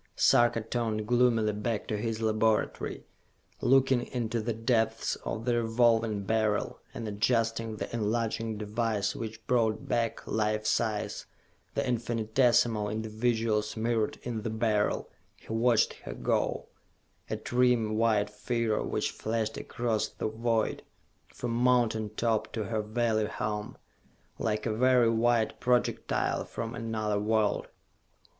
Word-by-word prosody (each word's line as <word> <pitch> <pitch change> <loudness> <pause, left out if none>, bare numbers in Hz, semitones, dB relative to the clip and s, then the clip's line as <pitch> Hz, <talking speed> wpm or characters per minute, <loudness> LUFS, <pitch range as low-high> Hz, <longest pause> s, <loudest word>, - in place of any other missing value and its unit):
Sarka 120 -3 +4
turned 110 -1 -2
gloomily 120 -3 +3
back 105 +1 -2
to 110 - -2
his 115 +1 -2
laboratory. 110 0 0 0.6
Looking 130 -1 +3
into 120 -2 -2
the 115 +2 -2
depths 115 -1 +1
of 110 - -5
the 120 -1 +2
Revolving 115 -2 +2
Beryl 110 0 0
and 115 - -6
adjusting 115 +1 0
the - - -4
enlarging 115 0 -1
device 105 -1 -1
which 110 -1 -6
brought 115 -3 +1
back, 115 -1 -1
life 110 0 0
size, 110 -1 -1 0.5
the - - +1
infinitesmal 115 -2 +2
individuals 110 0 -1
mirrored 115 -1 0
in 115 -3 -3
the 115 - -3
Beryl, 110 -2 0 0.3
he - - -9
watched 115 0 +3
her - - -9
go - - 0 0.6
a - - -2
trim 120 -3 +2
white 110 -2 +2
figure 115 +1 -1
which - - -1
flashed 110 0 -2
across 115 -3 -1
the - - -4
void, 110 0 0 0.5
from 120 - -5
mountain 120 -3 +2
top 115 -2 0
to 110 - -2
her 110 +2 -1
valley 110 0 0
home, 105 0 -4 0.6
like 110 -1 -1
a 110 - 0
very 125 0 +4
white 115 -1 +2
projectile 125 -1 +1
from 115 +1 -5
another 110 -3 -2
world. 105 0 +1
115 Hz, 125 wpm, -29 LUFS, 110-120 Hz, 0.6 s, Sarka